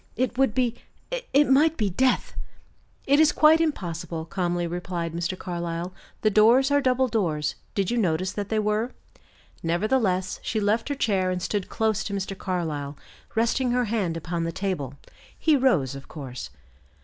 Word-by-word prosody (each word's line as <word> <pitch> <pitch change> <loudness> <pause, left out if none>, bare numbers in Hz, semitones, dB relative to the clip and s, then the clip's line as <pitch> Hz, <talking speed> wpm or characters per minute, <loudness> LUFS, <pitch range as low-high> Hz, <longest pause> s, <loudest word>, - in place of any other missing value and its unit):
"It 255 -1 -1
would 265 -3 +2
be 250 -3 +2 0.6
it 290 +2 +5
might 300 +4 +4
be 210 -4 0
death!" 255 +7 +1 0.7
"It 280 +2 +4
is 315 -1 +6
quite 315 +1 +5
impossible," 170 - -2
calmly 175 0 -1
replied 170 -1 -3
Mr. 170 +2 -2
Carlyle. 175 0 -4 0.3
"The 215 - +3
doors 235 +7 +5
are 285 0 +4
double 260 -1 +2
doors; 165 -11 0 0.2
did 195 0 0
you 240 - +1
notice 185 -2 +1
that 205 -1 -4
they 220 - 0
were?" 215 +3 0 0.7
Nevertheless, 185 +1 0
she 220 - -1
left 215 +5 +1
her 285 - -1
chair 195 -8 +1
and 180 0 -1
stood 200 +1 -2
close 220 -2 0
to 200 - -4
Mr. 195 0 -3
Carlyle, 155 -7 -3 0.4
resting 240 +2 +1
her 250 0 +2
hand 200 -7 -1
upon 170 +1 -3
the 165 - -2
table. 165 -8 -3 0.4
He 315 - +3
rose, 190 - +2
of 135 0 -9
course. 130 -5 -7
200 Hz, 165 wpm, -25 LUFS, 170-245 Hz, 0.7 s, is